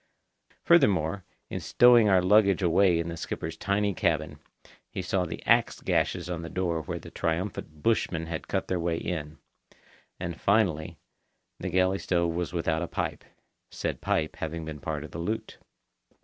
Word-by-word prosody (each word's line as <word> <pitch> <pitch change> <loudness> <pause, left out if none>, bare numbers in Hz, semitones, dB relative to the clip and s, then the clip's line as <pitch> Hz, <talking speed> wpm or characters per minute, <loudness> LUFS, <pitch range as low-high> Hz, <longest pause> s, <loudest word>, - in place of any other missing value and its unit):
Furthermore, 100 - +3 0.3
in - - -2
stowing 120 -3 +5
our 95 -2 +4
luggage 100 0 +4
away 90 +1 +4
in 85 0 -2
the 85 - -4
skipper's 80 0 -5
tiny 100 +4 0
cabin, - - -1 0.5
he - - -6
saw 90 0 0
the 85 - -7
axe - - +3
gashes 90 -2 0
on 85 -2 -4
the 85 - -6
door 85 -3 -1
where 75 - -5
the - - -11
triumphant 80 -3 -3
bushmen 90 -7 +1
had 80 -1 -5
cut - - -1
their 90 - -1
way 85 -1 0
in. 80 -3 -4 0.8
And, 85 -1 -5
finally, 95 -7 +1 0.6
the 95 - -3
galley 95 +2 +2
stove 85 -2 0
was 85 0 -2
without 80 -2 0
a 85 - -2
pipe—said - - -6
pipe 80 -1 -1
having 80 0 -4
been 80 -1 -6
part 75 +1 -4
of 75 - -10
the 85 - -6
loot. 105 +7 -4
85 Hz, 165 wpm, -28 LUFS, 80-95 Hz, 0.8 s, stowing